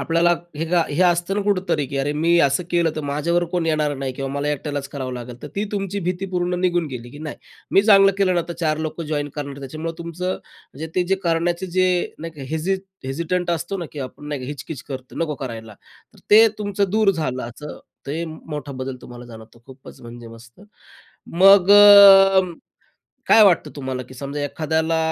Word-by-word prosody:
आपल्याला 170 +1 +2 0.2
हे 160 - -2
काय 170 -4 +1
हे 175 - +2
असतं 175 +1 +1
ना 205 - 0
कुठेतरी, 190 -7 0
की 140 - -6
अरे, 145 +2 -1
मी 165 +3 +2
असं 140 +5 +2
केलं 170 -2 +2
तर - - -2
माझ्यावर 170 +4 0
कोण 175 -2 0
येणार 155 -2 0
नाही 135 -1 -4
किंवा 135 +1 -5
मला 140 +1 -2
एकट्यालाच 145 -1 -3
करावं 130 -2 -5
लागेल. 125 0 -8
तर 150 - -7
ती 205 - 0
तुमची 200 0 -3
भीती 180 +2 -3
पूर्ण 180 -1 -2
निघून 175 -2 +1
गेली 120 -2 -8
की 145 - -12
नाही, 155 -1 -7 0.3
मी 195 - +4
चांगलं 195 -2 +6
केलं 190 -2 +2
ना, 175 - +1
तर - - -3
चार 155 -1 0
लोकं 160 +1 -4
जॉइन 145 -1 -2
करणार. 140 -1 -6
त्याच्यामुळे 155 +5 -6
तुमचं 170 +2 -4
म्हणजे 155 -3 -11
ते 180 - +2
जे 195 - +3
करण्याचे 170 +2 0
जे 185 0 0
नाही 165 +1 -7
का 140 - -8
हेजी 160 +5 -1 0.3
हेजिटंट 170 +6 -2
असतो 170 +4 -2
ना, 175 - -4
की 150 - -9
आपण 135 +3 -8
नाही 140 -4 -4
हिच-किच 140 0 -7
करतो, 130 -3 -9
नको 160 -2 -1
करायला, 115 -5 -8 0.4
तर - - -20
ते 220 +2 +8
तुमचं 205 -2 -1
दूर 215 0 +3
झालं, 140 -8 -3
असं 150 +5 -10 0.3
ते 155 +5 -3
मोठा 150 -3 -8
बदल 130 0 -5
तुम्हाला 120 0 -11
जाणवतो. 110 0 -14
खूपच 130 0 -14
म्हणजे 120 0 -11
मस्त 115 +6 -15 0.7
मग 195 +2 +6
अ, 200 -2 +9 0.9
काय 225 - +7
वाटतं 185 -5 +3
तुम्हाला, 130 -2 -5
की - - -11
समजा 140 +2 -5
एखाद्याला 160 +2 -1
160 Hz, 195 wpm, -21 LUFS, 140-180 Hz, 0.9 s, अ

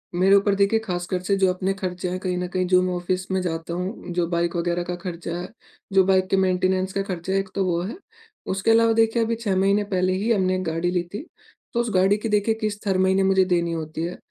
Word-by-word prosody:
मेरे 190 +2 +5
ऊपर 200 0 +3
देखिए 200 +3 +3
ख़ास 175 -2 -3
कर 185 - -1
से 200 +2 +1
जो 190 -1 +3
अपने 190 +1 -1
खर्चे 180 -2 -4
हैं 185 - -3
कहीं 180 -1 -2
न 180 - -2
कहीं 185 0 +1
जो 185 0 +4
मैं 185 0 -1
ऑफ़िस 185 +1 -2
में 190 - +1
जाता 165 -1 -3
हूँ, 180 +1 -5
जो 175 -1 0
बाइक 170 0 0
वग़ैरह 175 0 -1
का 175 0 -4
खर्चा 175 -1 -5
है, 180 - -5 0.5
जो 190 -1 +6
बाइक 190 -1 +3
के 195 - +2
मेंटेनेंस 185 0 +1
का 195 - 0
खर्चा 190 -1 -4
है, 195 - +3
एक 195 -1 -4
तो 195 -1 +1
वो 170 -1 0
है। 205 - -5 0.6
उसके 195 +4 +1
अलावा 230 0 +5
देखिए 225 +1 +2
अभी 230 +1 -1
6 215 -4 -2
महीने 200 +2 +2
पहले 185 0 +2
ही 205 +5 0
हमने 185 -3 +2
एक 185 - -2
गाड़ी 165 +1 -1
ली 180 -1 0
थी। 215 +10 -5 0.5
तो 235 - 0
उस 240 - 0
गाड़ी 190 +3 +4
की 225 +1 -4
देखिए 210 +2 +2
किश्त 210 -1 -3
हर 190 - +2
महीने 190 +1 +3
मुझे 190 0 +4
देनी 170 -2 +1
होती 160 0 -4
है। 175 +2 -4
185 Hz, 255 wpm, -23 LUFS, 180-195 Hz, 0.6 s, जो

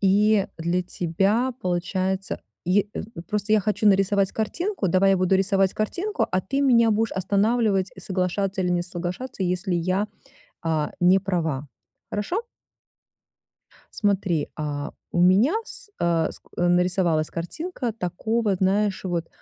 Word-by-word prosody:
И 200 +1 +4
для 170 +2 0
тебя 195 +9 0
получается 185 +2 -1 0.3
й 200 +3 +2
э, - - -3 0.3
просто 210 0 -1
я 215 - +5
хочу 210 +2 0
нарисовать 195 0 +3
картинку. 320 - -2
Давай 190 +3 +4
я 195 - +4
буду 185 +1 +2
рисовать 195 0 +2
картинку, 370 - -1
а 185 - +1
ты 275 +10 -2
меня 235 -5 +5
будешь 220 +1 +1
останавливать, 200 +1 +1
и 190 - -12
соглашаться 190 +1 -1
или 180 - 0
не 175 0 +1
соглашаться, 180 +6 -5
если 180 +1 -1
я, 185 +4 0 0.6
а, 160 -2 -1
не 180 +2 +6
права. 160 -7 -2 0.4
Хорошо? 345 - -2 1.6
Смотри, 195 -6 +1
а, 145 -1 -3 0.2
у 175 - +1
меня 200 - +5
с - - -11
а, 170 -2 +1
скл - - -16
нарисовалась 175 -2 +2
картинка 245 - -4
такого, 210 +2 -1
знаешь, 195 +1 +1
вот, 170 -2 -2
190 Hz, 135 wpm, -24 LUFS, 175-210 Hz, 1.6 s, не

